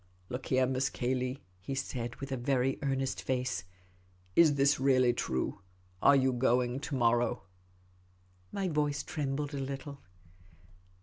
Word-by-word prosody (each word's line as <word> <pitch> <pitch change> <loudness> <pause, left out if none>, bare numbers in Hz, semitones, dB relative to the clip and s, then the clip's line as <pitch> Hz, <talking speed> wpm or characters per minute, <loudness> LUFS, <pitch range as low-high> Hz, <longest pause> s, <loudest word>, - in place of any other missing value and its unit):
" 90 0 -33
Look 125 +1 -4
here. 130 0 +3
Miss 130 +1 0
Cayley," 130 +1 -2 0.2
he 100 +9 -5
said, 120 -3 -3
with 135 0 -7
a - - 0
very 130 +1 0
earnest 135 -2 -1
face; 125 -6 -2 0.3
" 90 0 -33
is 155 -4 +6
this 140 0 +3
really 130 -2 +4
true? 65 - -2 0.4
Are 140 - +7
you 130 -1 +3
going 125 0 +1
to 145 0 -4
morrow? 120 -3 +2 0.6
" 90 0 -34
My 195 -1 -1
voice 150 -3 0
trembled 145 0 -3
a 140 - -3
little. 140 +1 -5
130 Hz, 150 wpm, -31 LUFS, 120-140 Hz, 0.6 s, Are